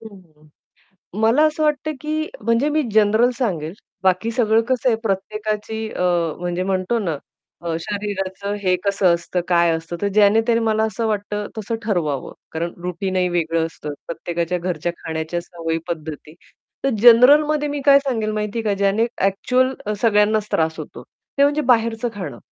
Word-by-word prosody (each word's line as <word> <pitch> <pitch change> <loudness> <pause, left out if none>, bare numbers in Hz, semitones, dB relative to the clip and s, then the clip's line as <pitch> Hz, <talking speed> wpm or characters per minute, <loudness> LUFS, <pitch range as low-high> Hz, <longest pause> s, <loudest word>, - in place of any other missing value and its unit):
हं. 180 -9 -15 0.7
मला 230 +7 +4
असं 310 0 0
वाटत 300 0 0
की 310 +1 -1 0.2
म्हणजे 230 +5 +2
मी 310 +1 +1
जनरल 220 +3 +4
सांगेल. 175 - -2 0.3
बाकी 190 +5 +2
सगळं 225 -2 +3
कसं 255 0 +2
आहे 225 - +3
प्रत्येकाची 215 +2 -3
अ, - - -5 0.4
म्हणजे 175 +1 -2
म्हणतो 190 +4 0
ना 165 -8 -2 0.4
अ, 170 -1 -2
शरीराचं 200 -1 -4
हे 185 -1 +3
कसं 195 -3 +3
असतं, 170 +1 -3
काय 170 -1 +3
असतं, 165 +1 -6
तर 205 - +1
ज्याने-त्याने 225 +3 +4
मला 220 -1 +1
असं 220 +1 -1
वाटत 210 -1 -2 0.2
तसं 220 +2 -3
ठरवावं 155 - -1 0.2
कारण 170 +1 -3
रुटीनही 180 +1 -1
वेगळं 165 -1 0
असतं, 150 -2 -7
प्रत्येकाच्या 170 +1 -2
घरच्या 175 -1 -2
खाण्याच्या 160 +1 -3
सवयी 165 -2 -4
पद्धती. 155 -2 -6 0.5
तर 275 - +2
जनरलमध्ये 290 +6 +6
मी 285 -1 -3
काय 280 -1 +7
सांगेल 230 -6 -2
माहिती 210 +1 -2
आहे 225 - -3
का 210 - +1
ज्याने 200 +3 +3 0.2
ॲक्चुअल 250 +7 +2 0.3
सगळ्यांनाच 210 -1 +3
त्रास 160 0 +1
होतो, - - -9
ते 280 - -3
म्हणजे 290 +2 +2
बाहेरचं 230 0 +1
खाणं. 155 -11 -6
205 Hz, 155 wpm, -21 LUFS, 175-230 Hz, 0.7 s, काय